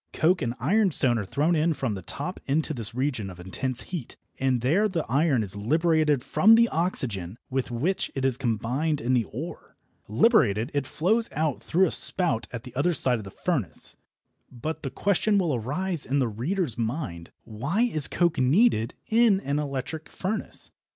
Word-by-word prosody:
Coke 180 +3 +2
and 120 -2 -2
ironstone 180 - +2
are 100 - -4
thrown 155 - +1
in 160 +1 +1
from 130 -6 -2
the 95 - -6
top 145 - -6
into 155 +3 0
this 115 -3 -4
region 125 -6 -2
of 90 -1 -11
intense 125 +8 -4
heat, 170 -10 -7 0.2
and 130 -2 +1
there 170 - +2
the 175 -6 -3
iron 140 -2 +2
is 100 -1 0
liberated 150 +4 +1
from 220 +3 +5
the 230 +1 +5
oxygen 115 - -2
with 130 0 -1
which 145 +11 -1
it 135 -1 -1
is 130 -2 +2
combined 125 +5 -1
in 125 +3 -1
the 120 -3 +2
ore. 150 +9 -8 0.3
Liberated, 115 - +3
it 140 -2 -1
flows 210 - 0
out 155 -2 -1
through 185 +3 +2
a 170 - -1
spout 135 -12 +4
at 125 +1 -7
one 170 +7 +1
side 125 -5 +2
of 105 - -9
the - - -7
furnace. 110 - -2 0.6
But 155 +6 -5
the 135 - -4
question 200 +6 +1
will 175 -6 +1
arise 150 - -2
in 140 - 0
the 130 -3 +2
reader's 125 - -2
mind: 110 - -4
Why 140 - -2
is 155 - +4
coke 170 -5 0
needed 130 - +3
in 225 -3 +3
an 140 -2 -1
electric 145 +2 -4
furnace? 205 +4 -3
140 Hz, 175 wpm, -26 LUFS, 120-170 Hz, 0.6 s, from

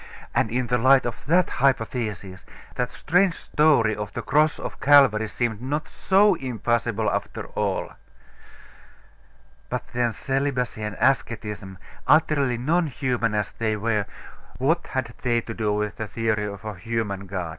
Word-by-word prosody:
And - - +1
in 125 +2 -1
the 125 +1 0
light 130 +2 +5
of 120 -3 -5
that 175 +3 +4
hypothesis, 110 -7 -1 0.3
that 125 -1 -1
strange 180 +5 +2
story 140 -9 +2
of 105 0 -6
the - - -4
Cross 150 +2 +2
of - - -7
Calvary 130 -7 +5
seemed 115 0 -2
not 145 +4 -2
so 200 +1 +3
impossible 120 - -1
after - - -2
all.... - - -1 1.8
But - - -2
then, 120 -1 +1
celibacy 130 -2 -2
and 105 -1 -4
asceticism, 105 -7 -1 0.3
utterly 140 -6 +3
non 160 +7 +1
human 125 -5 -1
as 105 -1 -1
they 110 -1 -1
were, 105 -1 -1 0.5
what 160 +7 +1
had 130 -3 -3
they 120 -2 +2
to 115 - -7
do 110 -2 -1
with 105 0 -2
the 110 - -4
theory 110 -1 -1
of 100 +1 -8
a 110 - -4
human 100 -1 -3
God? 90 -3 -4
120 Hz, 150 wpm, -24 LUFS, 105-135 Hz, 1.8 s, light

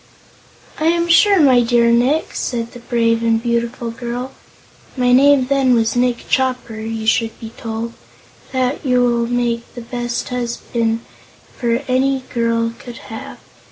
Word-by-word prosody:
"'I 310 - -1
am 340 +1 +2
sure, 390 +3 +5
my 260 -5 +5
dear 235 0 +3
Nick,' 255 +7 +2
said 235 -2 -3
the 245 - -11
brave 230 -1 +1
and 230 -1 +2
beautiful 235 0 -2
girl 245 +2 -5 0.7
my 250 -1 +2
name 280 +2 +6 0.3
was 225 -1 +1
then 245 - +2
Nick 245 -1 -1
Chopper, 250 -4 -1
you 220 0 -4
should 225 0 +1
be 225 -1 -8
told 225 +1 -5 0.6
'that 260 +2 -1
you 250 -3 +2
will 235 -1 +1
make 240 -1 -2
the 240 - -6
best 240 0 -4
husband 235 -2 -2 0.9
any 265 +1 +1
girl 230 -1 0
could 240 -2 -10 0.2
have. 220 - -8
240 Hz, 145 wpm, -18 LUFS, 230-255 Hz, 0.9 s, name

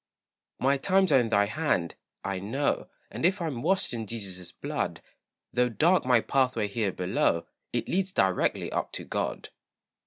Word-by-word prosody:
My 135 +2 +2
times 190 +3 +3
are 135 - +7
in 120 -2 0
thy 100 -2 +4
hand, 110 - 0 0.3
I 95 -1 -2
know; 130 +9 -1 0.2
And - - -6
if 190 +4 +3
I'm 155 -9 -3
washed 190 +3 +1
in 115 -2 -4
Jesus' 95 -6 -4
blood, - - -3 0.5
Though 125 0 +3
dark 165 +9 +3
my 125 -3 +5
pathway 125 -6 +1
here 100 -1 0
below, 90 -2 0 0.3
It - - -2
leads 190 +1 0
directly 95 - +1
up - - -2
to - - -5
God. - - -3
120 Hz, 160 wpm, -28 LUFS, 100-155 Hz, 0.5 s, are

